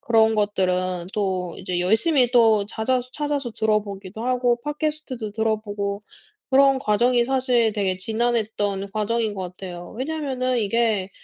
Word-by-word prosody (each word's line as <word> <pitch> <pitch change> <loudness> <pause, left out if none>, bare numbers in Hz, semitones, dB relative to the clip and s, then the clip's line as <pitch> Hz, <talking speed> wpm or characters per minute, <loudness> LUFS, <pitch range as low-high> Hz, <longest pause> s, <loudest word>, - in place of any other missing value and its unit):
그런 225 -1 +3
것들은 185 -4 0
또 185 -4 -1
이제 180 -1 -2
열심히 240 - +3
또 225 -4 +4
잦아서 245 +4 -1
찾아서 290 -4 -2
들어보기도 210 -1 -2
하고 245 -1 +1
팟캐스트도 295 -6 -3
들어보고 210 -2 -2 0.5
그런 270 0 +5
과정이 240 +1 +2
사실 250 -4 +2
되게 190 -3 0
지난했던 215 -2 -1
과정인 215 0 -1
것 190 - -4
같아요. 175 -2 -8
왜냐면은 260 -3 -1
이게 215 -3 +1
220 Hz, 320 characters per minute, -23 LUFS, 200-250 Hz, 0.5 s, 그런